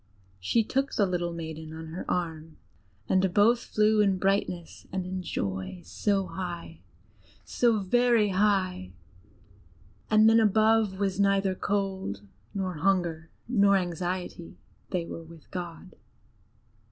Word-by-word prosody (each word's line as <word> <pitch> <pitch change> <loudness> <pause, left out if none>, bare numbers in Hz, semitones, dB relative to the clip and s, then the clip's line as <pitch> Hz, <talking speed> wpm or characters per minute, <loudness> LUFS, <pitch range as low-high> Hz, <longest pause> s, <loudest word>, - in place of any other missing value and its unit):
She 160 - +2
took 270 +5 -1
the 205 - +3
little 175 -2 -1
maiden, 160 -1 -7
on 160 0 -8
her 170 +3 -6
arm, 160 -3 -3 0.5
and 190 -1 +2
both 220 +6 +4
flew 215 -1 +2
in 195 -2 +3
brightness 185 -3 -1
and 185 -1 -2
in 185 0 -4
joy 95 - -4
so 200 -2 0
high, 175 -3 -6 0.7
so 235 -2 +2
very 235 +1 +3
high, 185 - +1 1.2
and 215 0 +6
then 225 +1 +6
above 220 -2 +3
was 195 -1 -1
neither 195 -1 +3
cold, 190 - -2 0.3
nor 185 -4 -2
hunger, 170 -2 0 0.2
nor 200 -4 +4
anxiety 175 -1 -4 0.3
they 180 -3 -1
were 165 - -7
with 165 -1 -15
God. 175 -3 -7
185 Hz, 125 wpm, -28 LUFS, 170-205 Hz, 1.2 s, and